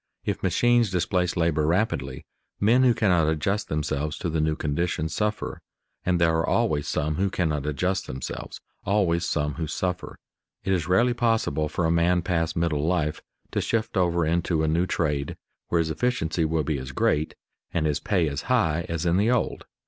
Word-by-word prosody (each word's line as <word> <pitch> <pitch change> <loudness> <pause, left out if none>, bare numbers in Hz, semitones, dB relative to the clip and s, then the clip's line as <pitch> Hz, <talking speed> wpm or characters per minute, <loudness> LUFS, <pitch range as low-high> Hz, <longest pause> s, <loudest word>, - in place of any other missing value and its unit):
If - - -2
machines 120 -2 +3
displace 90 -1 0
labor 80 -3 +2
rapidly, 95 +7 -1 0.3
men 115 +5 +4
who 125 -2 +4
cannot 90 -7 +3
adjust 95 +7 0
themselves 75 0 -2
to 85 - -3
the 80 -1 0
new 80 0 +1
conditions 80 +1 -1
suffer, 105 +2 -2 0.4
and 90 -1 +1
there 80 -1 +3
are 80 - 0
always 75 -2 +1
some 75 0 -1
who 100 +2 +1
cannot 75 -6 -1
adjust 95 +6 -1
themselves, 65 0 -6 0.2
always 85 -4 +1
some 75 -1 0
who 80 0 -4
suffer. 90 +3 -3 0.5
It 95 - +1
is 90 -3 0
rarely 110 +7 +3
possible 115 - +1
for 80 +2 -1
a 80 - +2
man 85 +1 +2
past 85 -3 0
middle 80 -3 0
life 80 -4 0 0.3
to - - 0
shift 110 -1 -1
over 85 -3 +2
into 85 0 +1
a - - +1
new 85 +4 +1
trade 75 -5 -1 0.3
where 85 - +1
his 80 -1 +1
efficiency 80 -7 0
will 80 0 0
be 70 -1 -1
as 65 +1 -7
great 75 +3 +1 0.4
and 80 -2 0
his 75 -2 +1
pay 90 -6 +1
as 70 0 -3
high 85 -10 +2
as 85 0 -2
in 85 +1 +3
the 105 +4 +3
old. 125 - 0
85 Hz, 185 wpm, -25 LUFS, 75-95 Hz, 0.5 s, men